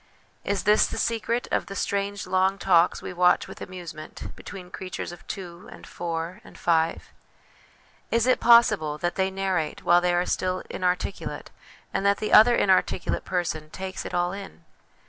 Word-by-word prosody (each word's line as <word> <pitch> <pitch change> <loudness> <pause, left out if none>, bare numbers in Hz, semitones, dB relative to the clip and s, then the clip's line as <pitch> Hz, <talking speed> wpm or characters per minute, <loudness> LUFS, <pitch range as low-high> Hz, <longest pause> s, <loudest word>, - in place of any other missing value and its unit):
Is 200 -1 -1
this 210 +1 +4
the - - -6
secret 230 +1 -1
of - - 0
the 195 - -7
strange 200 0 -2
long 190 +1 +1
talks 175 -3 +3
we - - -5
watch 180 0 +3
with - - -11
amusement 175 -4 -8
between 180 -3 -10
creatures 185 -2 -6
of 175 - -13
two, 180 -3 -8
and - - -12
four, 170 +1 -5
and - - -15
five? 165 -1 0 1.0
Is 230 0 +2
it 255 - +3
possible 195 -11 +5
that 175 +3 -1
they 190 -1 0
narrate 190 -5 -2
while 175 0 +5
they 175 0 +2
are 175 +1 +1
still 185 0 -1
inarticulate, 180 +1 -3 0.4
and - - -1
that 200 0 +3
the 215 - -3
other 240 +3 +8
inarticulate 190 -3 +1
person 160 -4 -2
takes 190 +2 -6
it - - -6
all 175 0 +1
in 195 0 -9
185 Hz, 165 wpm, -25 LUFS, 175-195 Hz, 1.0 s, other